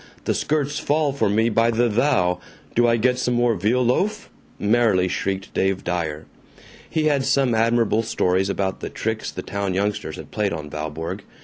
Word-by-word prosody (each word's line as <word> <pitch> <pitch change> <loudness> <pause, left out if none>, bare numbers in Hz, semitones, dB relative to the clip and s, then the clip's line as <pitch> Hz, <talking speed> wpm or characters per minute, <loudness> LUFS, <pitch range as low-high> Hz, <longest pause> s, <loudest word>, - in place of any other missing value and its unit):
The - - +1
skirts 150 -1 -1
fall 150 -1 +1
for 140 - +1
me 110 +3 +2
by 115 +1 +3
the 120 +1 +2
thou. 105 -7 +2 0.3
Do 120 0 +3
I 115 0 +3
get 125 +2 +1
some 125 -1 0
more 120 -1 +3
veal 115 +6 +1
loaf?" 190 - 0 0.3
merrily 105 -4 +3
shrieked 95 +1 -3
Dave 95 0 0
Dyer. 80 -3 -3 0.6
He 160 - 0
had 145 -3 +2
some 135 -2 +2
admirable 115 -1 +2
stories 95 -3 0
about 95 -1 -1
the - - -5
tricks 110 0 -3
the - - -6
town 100 -2 -2
youngsters 100 -5 -1
had - - -10
played 105 -3 -1
on 75 -2 -6
Valborg. 80 +2 -4
110 Hz, 180 wpm, -22 LUFS, 95-125 Hz, 0.6 s, by